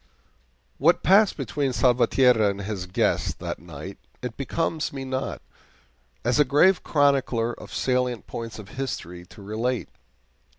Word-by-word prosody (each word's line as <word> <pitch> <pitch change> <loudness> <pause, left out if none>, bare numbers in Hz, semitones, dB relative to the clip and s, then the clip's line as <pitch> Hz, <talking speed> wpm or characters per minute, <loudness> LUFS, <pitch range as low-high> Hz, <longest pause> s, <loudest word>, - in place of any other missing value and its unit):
What 165 +6 +3
passed 200 +2 +5
between 135 +1 -2
Salvatierra 125 -3 +4
and 100 0 -4
his 95 -3 -4
guest 90 - 0
that - - -5
night - - -9 0.2
it 125 -2 -4
becomes 160 +2 -2
me 135 -1 -6
not, 130 0 -4 0.8
as 120 +3 +2
a - - +8
grave 150 +8 +4
chronicler 135 -5 +2
of - - -11
the - - -8
salient 125 -2 0
points 115 -1 -6
of 105 -3 -10
history, 90 -9 -5
to 105 - -14
relate. 115 +5 -2
125 Hz, 140 wpm, -25 LUFS, 110-140 Hz, 0.8 s, a